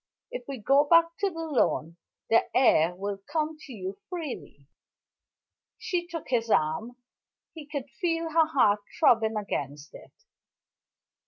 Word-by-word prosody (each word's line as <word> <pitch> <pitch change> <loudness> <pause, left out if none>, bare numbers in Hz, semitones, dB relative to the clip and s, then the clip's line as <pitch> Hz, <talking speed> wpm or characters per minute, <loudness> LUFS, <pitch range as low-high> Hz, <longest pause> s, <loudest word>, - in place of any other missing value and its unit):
If - - -6
we 275 -1 -5
go 275 +6 +3
back 335 +2 +4
to 400 - +1
the 330 -2 -6
lawn, 170 - 0 0.4
the 225 - +4
air 175 -9 +4
will 200 +1 -4
come 315 -1 -1
to 280 - -12
you 195 -3 -6
freely." 255 - -7 1.1
She 350 -1 -2
took 330 -3 -7
his 230 -3 0
arm; 160 +8 +1 0.6
he 310 -3 -10
could 285 -3 -5
feel 330 -2 -1
her 320 0 +4
heart 215 -9 +3 0.2
throbbing 220 -2 +4
against 145 -7 -4
it. - - -13
260 Hz, 140 wpm, -27 LUFS, 200-325 Hz, 1.1 s, back